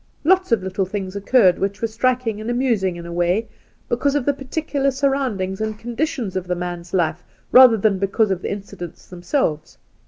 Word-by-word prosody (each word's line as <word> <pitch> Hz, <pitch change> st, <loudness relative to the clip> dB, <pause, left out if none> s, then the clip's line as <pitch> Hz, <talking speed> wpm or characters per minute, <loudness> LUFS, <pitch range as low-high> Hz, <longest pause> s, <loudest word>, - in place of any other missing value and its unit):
' -, -, -38 dB
Lots 375 Hz, -4 st, +2 dB
of 220 Hz, -5 st, +2 dB
little 190 Hz, 0 st, -2 dB
things 190 Hz, -1 st, -5 dB
occurred 200 Hz, -2 st, +3 dB
which 200 Hz, +1 st, -2 dB
were 230 Hz, -, 0 dB
strik 255 Hz, +3 st, 0 dB
ing 215 Hz, -2 st, -2 dB
and 220 Hz, -, -5 dB
amusing 235 Hz, -7 st, +1 dB
in 170 Hz, 0 st, -8 dB
a 170 Hz, -, -7 dB
way, 175 Hz, +6 st, +1 dB, 0.4 s
because 275 Hz, +4 st, 0 dB
of 285 Hz, -4 st, 0 dB
the 285 Hz, -, +2 dB
peculiar 275 Hz, +1 st, -2 dB
surroundings 260 Hz, -8 st, -1 dB
and 215 Hz, -1 st, -2 dB
conditions 240 Hz, -, -3 dB
of 185 Hz, -1 st, -3 dB
the 180 Hz, -, 0 dB
man's 175 Hz, -1 st, -5 dB
life 175 Hz, -1 st, 0 dB, 0.3 s
rather 250 Hz, -3 st, +8 dB
than 200 Hz, -2 st, +1 dB
because 200 Hz, +2 st, +1 dB
of 185 Hz, -1 st, -1 dB
the -, -, -3 dB
incidents 195 Hz, -4 st, -8 dB
themselves. 175 Hz, -, -2 dB
210 Hz, 195 wpm, -21 LUFS, 185-255 Hz, 0.4 s, rather